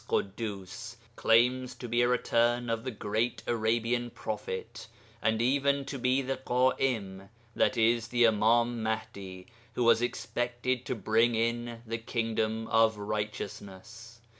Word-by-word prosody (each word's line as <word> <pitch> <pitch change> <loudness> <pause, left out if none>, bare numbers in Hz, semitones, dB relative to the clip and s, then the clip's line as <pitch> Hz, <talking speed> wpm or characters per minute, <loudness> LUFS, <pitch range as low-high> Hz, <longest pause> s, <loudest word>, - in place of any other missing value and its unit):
Ḳuddus) 105 +2 -3 0.2
claims 125 +3 +3
to 125 - -7
be 120 +1 +1
a 120 - +4
'return' 120 -1 +1
of 115 0 -2
the - - -1
great 110 +1 -2
Arabian 120 +1 0
prophet 110 +1 -6 0.3
and 110 0 +1
even 140 +2 +2
to 140 - -5
be 130 +2 +2
the 135 0 -2
Ḳa'im 125 -6 0
(i.e. 95 - -17 0.7
the 120 +1 0
Imām 115 +2 +3
Mahdi), 100 -4 -4 0.3
who 125 - +1
was 115 -1 +5
expected 120 +1 -2
to 130 - -1
bring 115 +2 +2
in 115 +1 -2
the 115 +1 -3
Kingdom 115 -1 -1
of 110 -1 +4
Righteousness. 105 +2 -6
115 Hz, 130 wpm, -30 LUFS, 110-120 Hz, 0.7 s, was